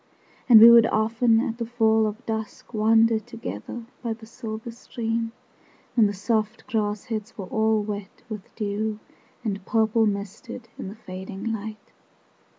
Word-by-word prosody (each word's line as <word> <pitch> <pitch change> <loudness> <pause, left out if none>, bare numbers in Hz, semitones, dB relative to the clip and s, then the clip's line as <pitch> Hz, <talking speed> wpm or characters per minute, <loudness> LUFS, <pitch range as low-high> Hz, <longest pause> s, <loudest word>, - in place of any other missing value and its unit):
And 230 -3 +10
we 230 +2 +11
would 230 -1 +8
often 225 +1 +3
at 230 +1 -3
the 235 - -1
fall 220 -2 +3
of 215 +4 -6
dusk 220 +1 -5
Wander 225 +1 +4
together 235 0 -7 0.2
by 230 -2 -2
the 220 0 -12
silver 225 0 -7
stream, 230 -1 -3 0.6
5 - - -36
When 220 -3 +6
the 205 - -2
soft 215 +2 -1
grass 210 -2 -1
heads 225 -2 -5
were 195 - -5
all 220 +2 +1
wet 205 -1 -6
with 215 -4 -7
dew, 210 0 -2 0.5
And 200 -3 -3
purple 220 +1 +2
misted 215 +4 -5
in - - -5
the 200 - -7
fading 195 -1 -8
light. 215 -1 -7
220 Hz, 155 wpm, -25 LUFS, 210-230 Hz, 0.6 s, we